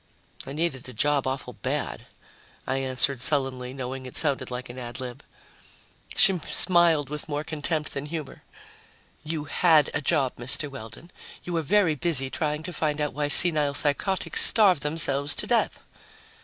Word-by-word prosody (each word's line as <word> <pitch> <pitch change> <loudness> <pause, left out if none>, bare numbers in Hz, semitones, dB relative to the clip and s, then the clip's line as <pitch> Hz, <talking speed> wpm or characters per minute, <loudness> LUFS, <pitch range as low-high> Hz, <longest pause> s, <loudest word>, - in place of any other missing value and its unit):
"I 135 - -5
needed 145 -5 -3
a - - -10
job 140 +3 +1
awful 130 0 -4
bad," - - -4 0.6
I 135 - -1
answered 130 0 +2
sullenly, 130 -3 -1
knowing 130 0 -6
it 125 - -6
sounded 145 -4 0
like 125 0 -5
an 120 +1 -9
ad 120 +1 -6
lib. 125 -2 -7 0.9
She 195 -1 +5
smiled 170 -4 +3
with 150 +1 -6
more 145 0 -2
contempt 155 0 -3
than 140 +1 -5
humor. 155 -3 -6 0.8
"You 155 -1 -3
had 155 +1 +3
a - - -1
job, 140 -3 0
Mr. 130 +4 -4
Weldon. 130 +7 -10 0.3
You 175 - -5
were 165 - +1
very 180 +1 +3
busy 135 -3 -1
trying 150 -1 -2
to 180 - -6
find 155 -2 -1
out 150 -1 -1
why 145 +1 -1
senile 150 -2 +6
psychotics 155 +7 0
starve 200 -7 +5
themselves 145 -1 0
to - - -3
death." - - +1
145 Hz, 160 wpm, -26 LUFS, 130-160 Hz, 0.9 s, senile